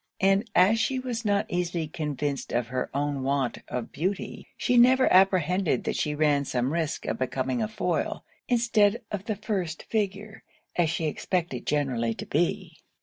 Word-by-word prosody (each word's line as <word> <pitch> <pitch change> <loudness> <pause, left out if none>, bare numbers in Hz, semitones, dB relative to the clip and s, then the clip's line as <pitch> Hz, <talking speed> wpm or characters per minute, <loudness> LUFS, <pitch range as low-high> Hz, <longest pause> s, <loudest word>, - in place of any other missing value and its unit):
And 195 +4 +3
as 200 +5 +5
she 260 +4 +1
was 245 -3 -3
not 205 0 +2
easily 175 -4 -2
convinced 150 -2 -3
of 120 -1 -1
her 125 0 -2
own 140 0 -1
want 135 -2 0
of 125 -2 -4
beauty, 185 +4 -3
she 250 - +1
never 255 +2 +6
apprehended 185 -5 +3
that - - -2
she 150 0 -1
ran 145 -2 +2
some 130 +1 -1
risk 165 -3 -2
of - - -2
becoming 130 0 -1
a - - 0
foil, 215 0 -2 0.2
instead 235 -2 +2
of 205 -1 -4
the 215 - -1
first 190 -6 -3
figure, 210 0 -3 0.3
as 170 -3 +2
she 165 0 -1
expected 160 -4 -2
generally 125 -6 0
to - - -6
be. - - -1
175 Hz, 165 wpm, -27 LUFS, 140-210 Hz, 0.3 s, never